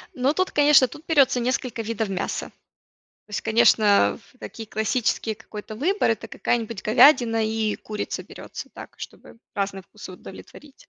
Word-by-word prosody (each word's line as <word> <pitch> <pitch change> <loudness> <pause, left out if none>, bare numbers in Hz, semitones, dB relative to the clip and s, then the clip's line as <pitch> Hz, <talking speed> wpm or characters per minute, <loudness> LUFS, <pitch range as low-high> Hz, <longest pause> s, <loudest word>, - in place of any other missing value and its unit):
Ну, 265 +3 +1
тут, 370 +3 0
конечно, 290 -3 +5
тут 300 +6 -13
берется 275 -6 +4
несколько 245 -1 -2
видов 220 -2 -3
мяса. 190 - -3 0.8
То - - -38
есть, 205 - -3
конечно, 220 -2 +4
в 255 - -26
такие 225 -2 -9
классические 220 0 -1
какой-то 215 0 -9
выбор- 355 - +1
это 225 - -4
какая-нибудь 230 -3 -2
говядина 225 -1 +5
и 220 -1 -1
курица 210 -1 -5
берется - - -10
так, - - -11
чтобы - - -11 0.2
разные 195 -1 -2
вкусы 205 +1 -12
удовлетворить. 265 +9 -13
225 Hz, 150 wpm, -24 LUFS, 215-260 Hz, 0.8 s, конечно